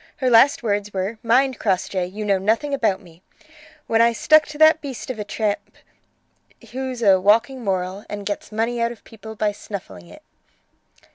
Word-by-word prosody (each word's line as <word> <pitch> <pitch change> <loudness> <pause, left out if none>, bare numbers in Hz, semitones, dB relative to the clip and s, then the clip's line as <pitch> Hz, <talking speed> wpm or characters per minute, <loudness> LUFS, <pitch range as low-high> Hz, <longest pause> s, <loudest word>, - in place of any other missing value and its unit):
Her 255 -2 0
last 240 +3 +5
words 205 -2 -1
were: 195 +4 -3
'Mind, 255 +3 +2
Crossjay, 185 -2 -1
you 210 +3 -6
know 200 -2 +2
nothing 225 +9 0
about 220 -8 0
me', 170 -1 -18 0.6
when 225 0 +2
I 235 0 +4
stuck 310 +6 +4
to 300 - -9
that 315 +1 +5
beast 270 -3 -6
of 235 - -8
a - - -2
tramp, 205 0 -2 1.1
who's 255 -1 -4
a 190 -3 +5
'walking 230 +6 +2
moral,' 190 0 -3
and 205 -1 -6
gets 205 +1 -5
money 230 +2 -1
out 235 0 0
of 240 - -12
people 220 0 -11
by 210 0 0
snuffling 175 - -9
it." 85 - -15
220 Hz, 180 wpm, -21 LUFS, 200-245 Hz, 1.1 s, last